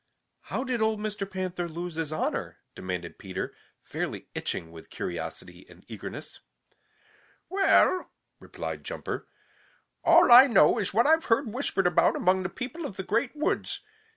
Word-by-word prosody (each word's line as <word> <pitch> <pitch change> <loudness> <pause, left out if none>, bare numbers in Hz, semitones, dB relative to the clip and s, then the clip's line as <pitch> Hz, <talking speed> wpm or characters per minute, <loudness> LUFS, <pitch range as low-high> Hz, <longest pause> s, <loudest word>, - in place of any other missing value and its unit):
"How - - -3
did 250 -4 -2
old 220 -1 +1
Mr. 210 -2 -4
Panther 185 -2 -3
lose 170 +2 -5
his 160 -1 -3
honor?" 155 - -2 0.2
demanded 90 -2 -6
Peter, 95 -1 -5 0.3
fairly - - -5
itching 80 -1 -3
with 80 -1 -12
curiosity - - -6
and - - -17
eagerness. - - -8 1.1
"Well," 380 -1 +3 0.3
replied - - -6
Jumper, - - -5 0.8
"all - - +6
I 250 +3 +11
know 235 -1 +5
is 200 - -1
what 230 +5 +3
I've 320 +2 +4
heard 230 -1 +1
whispered 240 -7 -1
about 175 -1 +4
among 185 +1 +2
the 185 - -3
people 260 - -6
of 200 - -10
the 190 - -3
Great 230 +8 0
Woods. 305 +3 -1
205 Hz, 150 wpm, -27 LUFS, 175-255 Hz, 1.1 s, I